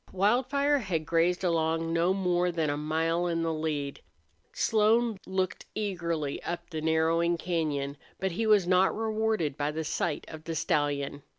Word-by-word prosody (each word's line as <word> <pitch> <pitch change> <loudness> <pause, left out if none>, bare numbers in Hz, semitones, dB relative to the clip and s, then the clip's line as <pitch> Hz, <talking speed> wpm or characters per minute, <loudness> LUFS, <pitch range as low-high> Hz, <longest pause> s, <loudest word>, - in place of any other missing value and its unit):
Wildfire 260 +9 +2
had 175 -9 -2
grazed 170 +3 +1
along 165 -1 +1
no 170 +2 +3
more 180 -2 +1
than 160 -3 0
a - - -1
mile 165 +3 0
in 165 -1 0
the 165 0 0
lead. 150 -3 -3 0.5
Slone 225 0 +2
looked 190 0 -2
eagerly 170 -8 -2
up 170 +1 -5
the 160 -1 -3
narrowing 165 +2 +2
cañon, 150 -5 -2 0.2
but 190 0 -1
he 220 +6 -1
was 210 -4 +5
not 185 +1 +4
rewarded 220 -8 0
by 145 - -1
a 160 +1 -3
sight 155 0 -2
of 155 0 -10
the 165 - -3
stallion. 145 -2 0
170 Hz, 160 wpm, -29 LUFS, 160-190 Hz, 0.5 s, was